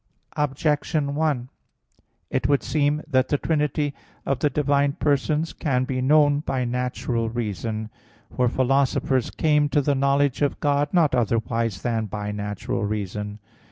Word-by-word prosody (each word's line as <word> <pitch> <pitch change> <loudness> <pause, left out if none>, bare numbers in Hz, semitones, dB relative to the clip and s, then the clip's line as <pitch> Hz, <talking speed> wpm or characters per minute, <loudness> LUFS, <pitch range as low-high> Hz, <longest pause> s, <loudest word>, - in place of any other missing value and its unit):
Objection 150 0 0
1: 145 -5 0 0.8
It 130 - 0
would 140 -1 +3
seem 150 0 +1
that 130 -4 +2
the 145 - +1
trinity 150 -1 0 0.3
of 135 -2 0
the 150 - +2
divine 140 0 +1
persons 150 +3 0
can 130 -4 0
be 130 0 -2
known 145 +1 +4
by 130 -4 -2
natural 120 -1 -2
reason. 110 -1 -3 0.4
For 125 - +2
philosophers 130 0 +1
came 150 -2 +2
to 145 - +2
the 145 +1 +1
knowledge 140 0 +1
of 145 - 0
God 145 0 +1
not 165 -6 +3
otherwise 115 -3 0
than 115 -2 -1
by 105 +1 -4
natural 105 -1 -3
reason. 105 0 -3
135 Hz, 140 wpm, -24 LUFS, 115-145 Hz, 0.8 s, known